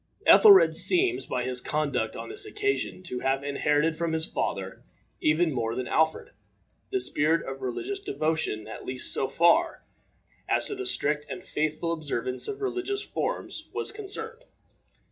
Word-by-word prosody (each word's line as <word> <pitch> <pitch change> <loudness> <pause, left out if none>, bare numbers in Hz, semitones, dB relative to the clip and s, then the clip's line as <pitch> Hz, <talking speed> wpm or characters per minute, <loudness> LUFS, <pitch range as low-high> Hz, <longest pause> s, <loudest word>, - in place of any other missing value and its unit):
Ethelred 405 -4 +8
seems 365 0 +2
by 125 -1 -2
his 125 0 -3
conduct 140 -8 -1
on - - -7
this 410 0 -3
occasion 410 - -2
to 125 -9 -3
have 135 +1 0
inherited 150 +3 +1
from 165 0 -2
his 160 0 -1
father, - - -3 0.4
even 155 +1 +2
more 115 -2 -2
than 125 0 -3
Alfred, 160 0 +1 0.6
the 390 - 0
spirit 160 - +2
of 135 0 -6
religious 345 - -3
devotion 160 - -2
at 110 - -8
least 130 0 -2
so 135 - 0
far 170 - +3 0.7
as - - +2
the 390 -2 -4
strict 150 - +1
and - - -7
faithful 155 +2 -1
observance 140 -6 -3
of 410 0 -5
religious 400 +1 -2
forms - - -4
was - - -2
concerned. 445 +3 -7
160 Hz, 150 wpm, -27 LUFS, -, 0.7 s, Ethelred